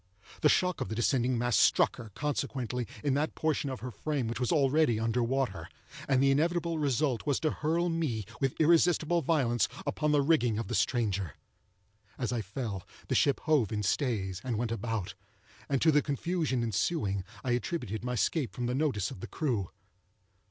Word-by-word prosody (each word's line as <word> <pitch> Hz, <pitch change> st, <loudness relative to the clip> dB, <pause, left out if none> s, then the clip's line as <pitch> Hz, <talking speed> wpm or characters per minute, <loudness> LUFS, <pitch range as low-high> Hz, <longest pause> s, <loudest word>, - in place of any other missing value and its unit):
The 150 Hz, -, +5 dB
shock 180 Hz, -3 st, +2 dB
of 130 Hz, -, -2 dB
the 110 Hz, -, -3 dB
descending 125 Hz, +1 st, +1 dB
mass 120 Hz, -1 st, +1 dB
struck -, -, +4 dB
her, 115 Hz, -2 st, -9 dB
consequently, 130 Hz, -4 st, -2 dB, 0.2 s
in 145 Hz, -2 st, +2 dB
that 150 Hz, +3 st, 0 dB
portion 155 Hz, -3 st, 0 dB
of 130 Hz, -, -5 dB
her 125 Hz, -, -5 dB
frame 140 Hz, +1 st, -2 dB
which 115 Hz, 0 st, -3 dB
was 125 Hz, -, 0 dB
already 145 Hz, -5 st, +3 dB
under 115 Hz, +2 st, 0 dB
water, 130 Hz, +2 st, -1 dB, 0.4 s
and 135 Hz, -1 st, +3 dB
the 135 Hz, -, +5 dB
inevitable 170 Hz, +3 st, +1 dB
result 140 Hz, -2 st, 0 dB
was 145 Hz, -, +2 dB
to 155 Hz, -2 st, +1 dB
hurl 165 Hz, +3 st, 0 dB
me, 155 Hz, -, -1 dB
with 135 Hz, -2 st, -1 dB
irresistible 170 Hz, +1 st, +4 dB
violence, 130 Hz, -7 st, +1 dB, 0.2 s
upon 150 Hz, -1 st, 0 dB
the 145 Hz, -1 st, +3 dB
rigging 135 Hz, -8 st, +2 dB
of 115 Hz, -, -4 dB
the -, -, -2 dB
stranger. 100 Hz, -, 0 dB, 0.8 s
As 125 Hz, -2 st, -2 dB
I 120 Hz, -, -1 dB
fell, 105 Hz, -1 st, -4 dB, 0.3 s
the -, -, +1 dB
ship 140 Hz, -, +3 dB
hove 145 Hz, -9 st, +2 dB
in 105 Hz, -1 st, -2 dB
stays, 100 Hz, -5 st, -1 dB
and 120 Hz, -4 st, -2 dB
went 115 Hz, 0 st, -1 dB
about; 115 Hz, -3 st, -3 dB, 0.6 s
and 140 Hz, -2 st, +2 dB
to 160 Hz, -, +6 dB
the 150 Hz, 0 st, +4 dB
confusion 145 Hz, -3 st, -1 dB
ensuing 100 Hz, -, 0 dB, 0.2 s
I 130 Hz, -, -1 dB
attributed 120 Hz, -, -2 dB
my 125 Hz, 0 st, -2 dB
escape 125 Hz, -, 0 dB
from 125 Hz, -2 st, -2 dB
the 120 Hz, -, -1 dB
notice 130 Hz, -9 st, 0 dB
of -, -, -9 dB
the -, -, -6 dB
crew. 120 Hz, -, -1 dB
130 Hz, 185 wpm, -30 LUFS, 115-150 Hz, 0.8 s, to